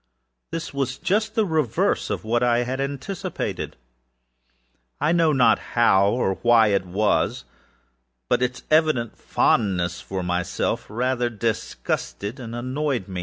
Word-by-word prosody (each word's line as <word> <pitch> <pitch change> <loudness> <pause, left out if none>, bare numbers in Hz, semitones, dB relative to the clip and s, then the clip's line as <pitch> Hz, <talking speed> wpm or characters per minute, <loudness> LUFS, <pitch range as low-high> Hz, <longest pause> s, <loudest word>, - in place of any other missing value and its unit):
This 165 -3 -5
was 135 -2 -2
just 215 +3 0
the 220 -2 +3
reverse 155 - 0
of - - -3
what 115 +2 0
I 120 0 +3
had 130 +2 -3
anticipated; 140 +7 -4 1.2
butâI 160 +3 +2
know 165 -2 +4
not 130 -4 +4 0.2
how 100 -4 +5
or 100 -4 0
why 115 -2 +5
it 100 -2 0
wasâits 100 +4 +1 1.3
evident 155 -7 +2
fondness 90 -5 +1
for 95 -1 -4
myself 90 0 -1
rather 125 +2 0
disgusted 110 0 -3
and 115 -2 -7
annoyed. 130 -1 -2
120 Hz, 120 wpm, -23 LUFS, 105-140 Hz, 1.3 s, how